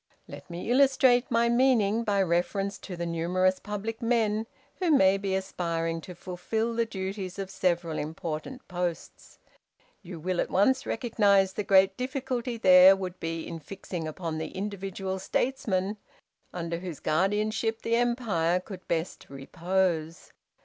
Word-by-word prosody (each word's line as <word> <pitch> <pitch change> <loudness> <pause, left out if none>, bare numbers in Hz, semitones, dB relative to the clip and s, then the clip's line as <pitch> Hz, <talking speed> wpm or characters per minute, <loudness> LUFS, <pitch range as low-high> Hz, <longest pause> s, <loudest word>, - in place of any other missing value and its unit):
"Let - - -11
me 175 +7 -4
illustrate 260 -2 +4
my 235 0 +3
meaning 235 -3 +3
by 200 -3 +2
reference 190 +3 -1
to 185 - -7
the 170 - -3
numerous 180 +3 +1
public 210 +3 -5
men 225 -2 +1 0.3
who 365 -2 0
may 195 -11 +5
be 195 -1 -1
aspiring 165 -3 -2
to 180 +2 -10
fulfil 205 +7 -3
the 230 0 0
duties 190 -2 -5
of 195 -1 -5
several 175 -4 0
important 160 - -5
posts. 175 -2 -5 0.6
You 180 -3 -9
will 180 +2 -1
at - - -3
once 260 +8 +2
recognize 200 -5 +2
the 210 - -2
great 195 0 +4
difficulty 250 -2 -3
there 185 -2 +8
would 185 -1 -6
be 165 0 -4
in 165 - -6
fixing 175 -1 -6
upon 160 0 -4
the 160 - -4
individual 195 -1 -4
statesman 205 -2 -1 0.5
under 170 -1 -4
whose 175 -5 -7
guardianship 215 +6 0
the 230 - +1
empire 230 -8 +1
could 185 0 -10
best 165 +1 -3
repose. 165 +3 -2
190 Hz, 140 wpm, -28 LUFS, 175-225 Hz, 0.6 s, there